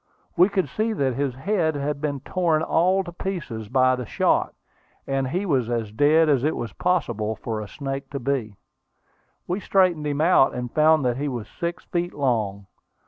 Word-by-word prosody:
We 180 +2 +5
could 190 -5 0
see 215 - -1
that 135 -10 0
his 135 -1 -2
head 160 +1 0
had 145 0 -3
been 145 -3 -2
torn 165 -2 0
all 185 +4 +2
to 175 - -8
pieces 160 - -5
by 130 0 +3
the 125 -3 -6
shot, - - +1 0.5
and 135 -1 -1
he 180 +9 -2
was 130 - +1
as 115 -3 -2
dead 150 +7 +4
as 140 -4 +2
it 155 - +1
was 115 -4 -5
possible 115 - -1
for 110 0 -4
a 105 - -7
snake 135 +2 -5
to 140 - -4
be. 120 -5 -2 0.9
We 180 +3 -2
straightened 185 -7 +2
him 145 0 -2
out, 160 -4 +4
and 125 -1 -5
found 155 -2 +4
that 120 -1 +1
he 145 +2 -2
was 120 -6 -4
six 170 - -5
feet 175 0 -3
long. 110 -8 -1
140 Hz, 190 wpm, -24 LUFS, 125-170 Hz, 0.9 s, We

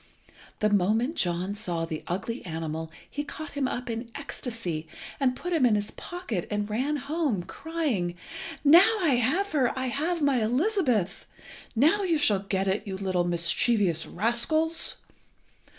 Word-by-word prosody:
The 215 - +4
moment 215 - +2
John 180 - 0
saw 175 -6 -1
the 160 -2 -5
ugly 200 +7 -3
animal 160 -1 -4 0.2
he 290 - -4
caught 310 +1 -7
him 280 -2 -1
up 250 0 -4
in 230 0 -4
ecstasy, 225 - -4 0.3
and 255 -2 +2
put 355 +6 -4
him 320 -5 +2
in 235 -4 +5
his 205 0 -1
pocket 350 - -5
and 210 -1 -1
ran 255 +8 0
home, 280 - -1
crying 270 - -2 0.5
"Now 350 +9 +7
I 295 -8 +3
have 355 - +1
her! 265 -5 +2
I 260 -1 -1
have 320 +5 -1
my 270 -4 +3
Elizabeth! 250 - +1 0.5
Now 315 - +4
you 350 -5 +2
shall 220 -10 +3
get 195 0 -1
it, 205 +3 0
you 190 -1 -3
little 185 -2 0
mischievous 175 +1 +2
rascals!" 310 - 0
235 Hz, 150 wpm, -27 LUFS, 190-295 Hz, 0.5 s, Now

